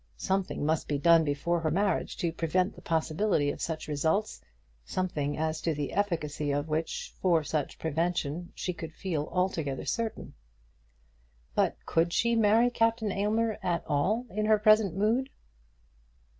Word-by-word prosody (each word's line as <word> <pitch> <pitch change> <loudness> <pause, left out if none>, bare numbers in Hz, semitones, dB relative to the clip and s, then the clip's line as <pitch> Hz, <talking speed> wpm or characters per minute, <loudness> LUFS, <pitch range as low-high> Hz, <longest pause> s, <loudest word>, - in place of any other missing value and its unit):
Something 190 -5 -1
must 155 +1 0
be 145 - 0
done 165 +2 +5
before 155 +4 0
her 160 -1 0
marriage 195 +3 0
to 170 -2 -1
prevent 180 +4 0
the - - -14
possibility 160 -1 +1
of - - -8
such 160 -2 -3
results, 160 +8 0 0.4
something 145 - -2
as 155 0 -1
to 165 -2 0
the 145 -1 -3
efficacy 160 -7 -1
of 145 +1 -1
which 160 +1 -3
for 170 -4 +3
such 150 -1 -2
prevention 165 +1 -2
she 180 - -3
could 165 -2 -8
feel 160 -6 -3
altogether 170 -7 -1
certain. 230 -1 -3 1.2
But - - +1
could 170 +1 +1
she 235 0 +2
marry 225 +2 +4
Captain 225 -2 +1
Aylmer 215 +3 0
at 175 -2 -1
all 190 +12 +1
in 215 +2 -1
her 215 0 +5
present 215 -4 +4
mood? 225 +7 +1
170 Hz, 150 wpm, -29 LUFS, 155-205 Hz, 1.2 s, done